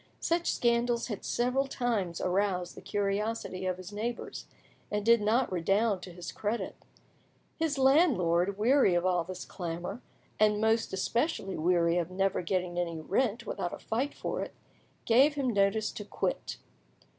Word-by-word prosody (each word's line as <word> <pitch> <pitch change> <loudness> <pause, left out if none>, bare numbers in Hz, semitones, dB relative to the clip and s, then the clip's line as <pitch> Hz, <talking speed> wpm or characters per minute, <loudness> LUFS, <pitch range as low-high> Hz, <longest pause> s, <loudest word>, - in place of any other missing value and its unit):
Such 340 +1 +1
scandals 235 0 +1
had 210 - -5
several 255 +3 0
times 215 -10 -1
aroused 180 -1 0
the - - -11
curiosity 205 -1 -2
of 185 -1 -1
his 185 +2 -9
neighbours, 230 +3 -4 0.4
and 210 0 -2
did 235 -1 +6
not 230 +4 +2
redound 195 +3 +1
to 180 - -9
his 175 0 -7
credit. 215 +3 -3 0.8
His 320 -3 0
landlord, 200 - +3
wearied 230 -3 +4
of 175 - -1
all 180 -2 +2
this 185 +2 -7
clamour, 175 +5 -5 0.4
and 210 -1 +4
most 220 +1 +2
especially 195 - -1
weary 170 +1 +2
of 170 0 -2
never 190 +1 0
getting 180 0 -1
any 170 -2 -2
rent 215 +7 0
without 175 - -3
a - - -5
fight 255 +6 -2
for - - -3
it, - - -6 0.5
gave 270 +6 +5
him 270 -4 0
notice 205 +2 +2
to 210 - -7
quit. - - -3
205 Hz, 155 wpm, -30 LUFS, 180-235 Hz, 0.8 s, did